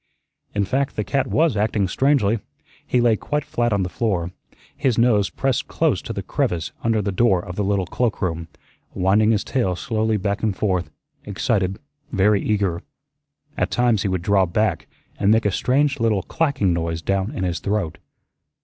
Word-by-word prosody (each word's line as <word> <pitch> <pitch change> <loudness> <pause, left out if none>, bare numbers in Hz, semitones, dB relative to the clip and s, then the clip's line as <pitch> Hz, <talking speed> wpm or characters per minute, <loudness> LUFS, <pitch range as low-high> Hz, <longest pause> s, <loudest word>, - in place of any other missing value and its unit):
In 100 -1 +1
fact, 135 +7 -1
the 105 - -1
cat 130 +7 0
was 155 -2 +2
acting 105 -1 +1
strangely. 115 -2 +2 0.5
He 125 - +2
lay 120 -2 +4
quite 150 +6 -2
flat 120 -6 0
on 100 -2 +1
the - - -1
floor, 90 -4 -1 0.4
his 130 -6 0
nose 110 -4 +3
pressed 135 -3 -1
close - - +1
to - - -7
the - - -4
crevice 85 -4 -1
under 115 -2 +1
the 100 - -1
door 95 -3 +2
of 90 -2 -7
the 105 - -1
little 100 -1 +1
cloakroom, 90 -6 -2 0.5
winding 100 +4 +3
his 110 -2 +2
tail 120 -9 0
slowly 110 +3 0
back 100 0 -2
and 105 -4 -1
forth, 95 -4 0 0.3
excited, 100 -2 -1 0.3
very 100 -1 +3
eager. 100 -5 0 0.7
At 90 - 0
times 115 -1 +2
he - - 0
would 95 -2 -1
draw 95 -1 +3
back 105 +6 0 0.3
and 100 - +2
make 110 +1 +4
a 105 - +3
strange 140 +6 +1
little 110 -5 +1
clacking 135 - 0
noise 85 -1 -2
down 100 +2 0
in 95 - -2
his 90 -1 -1
throat. 100 -5 -2
105 Hz, 175 wpm, -22 LUFS, 95-115 Hz, 0.7 s, lay